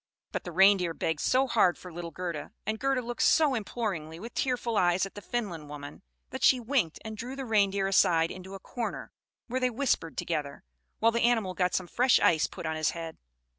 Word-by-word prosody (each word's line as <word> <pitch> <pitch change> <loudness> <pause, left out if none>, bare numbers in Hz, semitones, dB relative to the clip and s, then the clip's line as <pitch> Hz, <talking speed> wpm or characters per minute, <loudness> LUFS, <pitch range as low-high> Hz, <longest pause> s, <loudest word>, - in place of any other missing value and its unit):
But - - -4
the 175 - -5
Reindeer 185 -2 +4
begged 160 -2 -1
so 260 - +3
hard 200 -8 +3
for 180 -2 -11
little 170 0 -5
Gerda, 170 -4 -5
and 215 0 -2
Gerda 270 -1 0
looked 240 +1 -4
so 305 -4 +4
imploringly 195 -8 -3
with 230 +5 -8
tearful 245 -3 -1
eyes 180 -1 +3
at 195 - -10
the 205 - -9
Finland 185 -11 -4
woman, 145 +2 -9 0.3
that 260 -1 -5
she 260 - +6
winked, 235 - 0
and 220 0 -5
drew 245 +5 -6
the 270 -1 -5
Reindeer 200 -3 +2
aside 165 -4 +3
into 185 +1 -9
a - - -8
corner, 235 +4 -5 0.3
where 255 +1 -2
they 255 -1 +2
whispered 240 -9 -1
together, 150 -4 -3 0.3
while 230 +1 +3
the 235 +1 0
animal 225 -6 +2
got 180 0 0
some 185 - -1
fresh 245 +8 +3
ice 155 -2 +3
put - - -9
on 160 0 -1
his 155 - +1
head. 165 -1 -7
195 Hz, 210 wpm, -29 LUFS, 170-240 Hz, 0.3 s, she